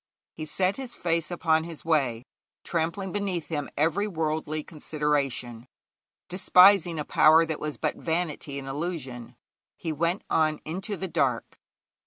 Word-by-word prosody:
He 155 -1 -7
set 185 +5 0
his 265 -3 -5
face 165 -2 -1
upon 160 -2 +1
his 165 -1 -8
way, 135 -8 +1 0.4
trampling 175 +3 -2
beneath 195 -5 -2
him 150 -3 -3
every 170 +8 +1
worldly 155 -3 -2
consideration, 145 -7 -2 0.6
despising 180 -1 +5
a 150 - -3
power 160 +2 +6
that 160 -2 -4
was 150 -1 -4
but - - -2
vanity 160 -4 -2
and 135 -1 -6
illusion; 135 -6 -5 0.4
he 165 - -3
went 170 +5 0
on 155 -1 +1
into 190 +5 -4
the 190 - -3
dark. 135 -8 -1
160 Hz, 140 wpm, -27 LUFS, 150-175 Hz, 0.6 s, power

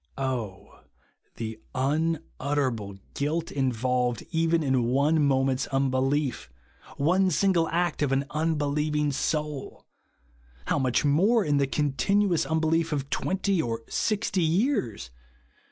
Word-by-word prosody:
Oh 125 -8 -4 0.6
the 110 -1 -5 0.2
unutterable 140 -6 -1 0.2
guilt 160 +4 -2
involved 125 -2 0
even 165 0 +2
in 130 -4 +1
one 145 +5 +2
moment's 135 -1 +1
unbelief 135 - 0 0.2
— - - -20
one 185 +6 +3
single 180 -3 +2
act 175 -1 0
of 145 -2 +1
an 135 +1 +1
unbelieving 150 -1 0
soul 150 0 -3 0.8
I - - -5
How - - +2
much 130 +1 +1
more 195 +10 +3
in 145 -1 +2
the 140 -1 +2
continuous 170 +7 +1
unbelief 160 +1 +1
of 140 -2 -3
twenty 190 -1 0
or 115 -3 -3
sixty 210 -3 0 0.2
3^ears 115 - -2
145 Hz, 120 wpm, -27 LUFS, 130-165 Hz, 0.8 s, one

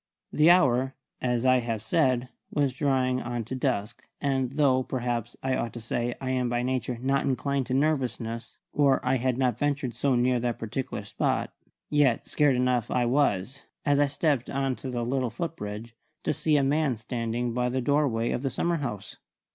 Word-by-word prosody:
The 155 +2 +5
hour, 135 -6 +4 0.3
as 125 -1 0
I 130 0 +5
have 115 -2 -2
said, 130 -1 +1 0.2
was 140 -3 +1
drawing 130 -2 +1
on 120 -1 -3
to 115 - -7
dusk; 120 -4 -2 0.2
and 135 -2 0
though, 135 -3 +3
perhaps 120 -3 -3
I 130 -1 +1
ought 115 - -2
to 120 - -6
say, 120 +1 -2
I 130 -1 -2
am 125 -1 0
by 120 0 0
nature 125 -1 -1
not 135 +2 +1
inclined 135 0 0
to 130 - 0
nervousness 125 -6 -1 0.2
(or 140 -2 +4
I 130 +1 +3
had 125 0 0
not 125 -3 +1
ventured 145 -4 0
so 135 +3 +1
near 125 0 +2
that 120 -1 -1
particular 115 +4 -4
spot), - - -1 0.4
yet 145 -5 +3
scared 145 -3 +2
enough 125 -2 +1
I 125 - +1
was, 125 -1 0 0.2
as 145 0 +3
I 145 - +4
stepped 140 -3 0
on 135 -1 0
to 130 - -6
the 120 -2 -2
little 130 0 0
foot 165 +9 -4
bridge, 105 +1 -7 0.3
to - - +1
see 155 -2 +2
a 140 - +3
man 140 -2 +1
standing 115 +1 -2
by 125 +1 0
the 130 +1 -1
doorway 130 -4 +1
of - - -1
the 135 - -1
summer 170 +5 0
house. 105 - -5
130 Hz, 190 wpm, -27 LUFS, 120-135 Hz, 0.4 s, The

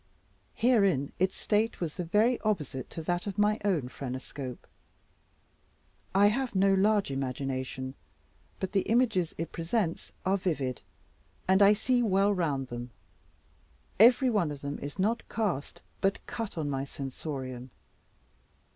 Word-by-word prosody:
Herein 200 - +3
its 185 +1 +1
state 220 +2 0
was 165 -4 -2
the 180 - -4
very 215 +8 +3
opposite 150 - -2
to 165 - -6
that 175 +4 -1
of 200 0 -4
my 210 +1 +3
own 175 -11 +1
phrenoscope. 130 0 -6 1.5
I 200 +1 +6
have 245 +1 -2
no 195 +1 +4
large 200 -3 +3
imagination; 130 0 -3 0.7
but 190 - -3
the 195 - +2
images 220 -8 +2
it 165 - -4
presents 170 +1 -2
are 190 +1 +3
vivid, 145 - -2 0.7
and 190 +2 +4
I 200 +1 +8
see 245 +4 +1
well 200 -2 +3
round 145 -8 -1
them. 120 +1 -6 1.1
Every 245 +3 +7
one 200 -8 +2
of 145 -1 -7
them 140 0 -4
is 145 +5 -7
not 220 +5 +1
cast, 200 -11 -2 0.2
but 195 0 0
cut, 225 -6 -5
on 155 -2 -1
my 135 -1 -1
sensorium. 135 -2 -6
185 Hz, 140 wpm, -29 LUFS, 140-210 Hz, 1.5 s, I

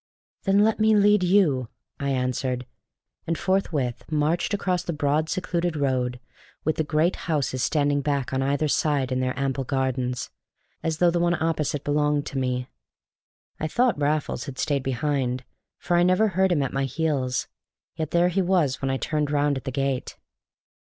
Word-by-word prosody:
"Then 195 +1 +4
let 220 +1 +2
me 215 0 +4
lead 205 0 +5
you, 175 - +3 0.3
I 140 - -1
answered, 125 -1 -1 0.6
and 165 0 0
forthwith 160 -11 -1
marched 155 +4 +1
across 185 -3 0
the 170 - -4
broad, 150 +2 0
secluded 175 -2 -1
road, 125 -3 0 0.4
with 155 - 0
the 160 - +1
great 155 +4 +1
houses 140 -5 0
standing 145 +1 +1
back 140 -2 -1
on 130 - +1
either 140 +3 +1
side 145 -3 +1
in 130 - 0
their 130 0 -1
ample 135 -1 -1
gardens, 130 -2 -2 0.5
as 160 -1 -1
though 175 +1 +4
the 175 - 0
one 175 0 +2
opposite 155 -3 -1
belonged 150 0 +1
to 135 - -3
me. 125 -1 -1 0.9
I 155 - -1
thought 235 - +1
Raffles 150 +1 0
had 135 -3 -7
stayed 140 -2 0
behind, 130 -1 -1 0.3
for 175 - -1
I 175 - +4
never 185 +5 +4
heard 190 0 +2
him 150 -5 +2
at 135 - -3
my 135 0 0
heels, 135 -3 -1 0.5
yet 160 -2 -3
there 175 +1 +3
he 190 +2 +1
was 175 -8 +1
when 135 - -1
I 135 - 0
turned 150 +1 -1
round 145 0 +2
at 130 - -6
the 130 - -2
gate. 135 0 -2
145 Hz, 175 wpm, -25 LUFS, 135-170 Hz, 0.9 s, lead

